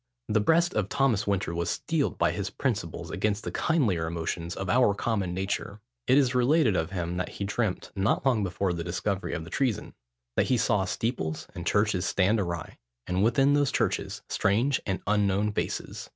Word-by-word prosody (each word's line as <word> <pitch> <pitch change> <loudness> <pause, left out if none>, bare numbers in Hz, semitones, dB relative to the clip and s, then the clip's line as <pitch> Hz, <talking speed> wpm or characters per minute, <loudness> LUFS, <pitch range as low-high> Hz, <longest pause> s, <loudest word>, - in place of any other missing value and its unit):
The 110 0 +3
breast 170 +10 +3
of 105 -2 0
Thomas 120 -6 +1
Winter 100 -4 0
was 85 0 -1
steeled - - -1
by - - +2
his - - -3
principles - - -3
against 105 +3 -1
the - - -4
kindlier 105 - +1
emotions 85 +1 -3
of 95 - -4
our 105 0 +4
common 100 -4 -1
nature. 95 +2 -3 0.3
It 130 - +5
is 135 -3 +3
related 125 - +3
of 80 -1 0
him, 90 -2 -3
that 90 - -2
he - - -3
dreamt, 100 -1 -2
not 100 +7 +1
long 120 -6 +3
before 95 0 -1
the 85 -1 -3
discovery 95 +3 -2
of 80 - -4
the 80 - -11
treason, 120 -6 -1 0.4
"that - - +3
he 130 - +3
saw 105 -4 +2
steeples 100 -9 -2
and - - -6
churches 100 -3 +2
stand 100 +5 +2
awry, 85 -5 -4 0.3
and 90 +2 0
within 135 +5 +4
those 145 -2 +2
churches - - -1
strange 120 +8 +1
and 95 -1 -1
unknown 105 0 +2
faces." - - -4
100 Hz, 185 wpm, -28 LUFS, 90-120 Hz, 0.4 s, It